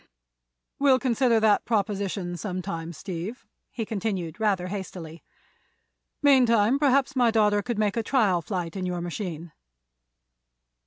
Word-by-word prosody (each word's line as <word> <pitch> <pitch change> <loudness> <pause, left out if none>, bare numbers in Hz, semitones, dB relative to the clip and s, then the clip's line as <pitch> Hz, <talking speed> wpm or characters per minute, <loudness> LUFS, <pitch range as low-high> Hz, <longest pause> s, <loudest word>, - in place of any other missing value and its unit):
"We'll 275 -2 +5
consider 245 -2 +2
that 215 -2 +3
proposition 200 -4 -2
some 185 0 -4
time, 165 0 -5
Steve," 180 - -6 0.2
he 225 - -4
continued, 195 -5 -3
rather 200 -5 +1
hastily. 180 -4 -7 1.0
"Meantime, 250 -3 +4
perhaps 275 -2 +2
my 245 -2 +4
daughter 210 -2 +3
could 235 +1 -4
make 210 -2 +1
a - - +2
trial 210 -7 +2
flight 175 -1 -4
in 185 -1 -3
your 180 -1 -3
machine." 175 -2 -5
205 Hz, 125 wpm, -26 LUFS, 180-230 Hz, 1.0 s, We'll